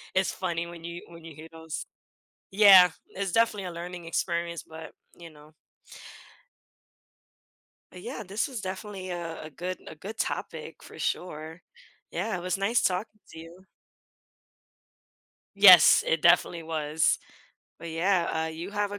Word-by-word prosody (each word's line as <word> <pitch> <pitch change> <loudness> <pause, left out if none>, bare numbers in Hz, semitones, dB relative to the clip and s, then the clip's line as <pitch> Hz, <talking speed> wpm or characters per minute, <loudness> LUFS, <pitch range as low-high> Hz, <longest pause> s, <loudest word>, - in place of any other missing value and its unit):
It's 190 0 +2
funny 170 -2 -3
when 170 -1 -11
you 170 +1 -7
when 170 -1 -13
you 160 -2 -11
hear 160 +2 -12
those 160 -1 -7 0.7
Yeah, 190 -3 +8 0.2
it's 195 -2 -4
definitely 225 -4 +1
a 180 - -5
learning 175 0 -8
experience, 170 0 -2
but 160 0 -11 0.2
you 170 -1 -11
know. 150 0 -18 2.4
Uh, - - -9
yeah, 230 +7 -7
this 200 +4 -2
was 255 -7 -6
definitely 190 0 -6
a 170 -2 -6
a 155 - -8
good 180 +5 -6
a - - -9
good 205 +8 -9
topic - - -5
for - - -13
sure. 160 -1 -4 0.5
Yeah, 185 +3 -2
it - - -7
was 180 +1 -1
nice 205 +5 +1
talking 200 +3 -2
to 160 - -11
you. 170 +3 -13 1.9
Yes, 185 -5 +8
it 160 -1 0
definitely 170 -1 +3
was. 155 -1 0 0.6
But, 170 0 -8
yeah, 170 -1 0
uh, - - -3
you 165 +4 -7
have 205 0 -2
a 205 - -5
175 Hz, 150 wpm, -27 LUFS, 165-190 Hz, 2.4 s, Yeah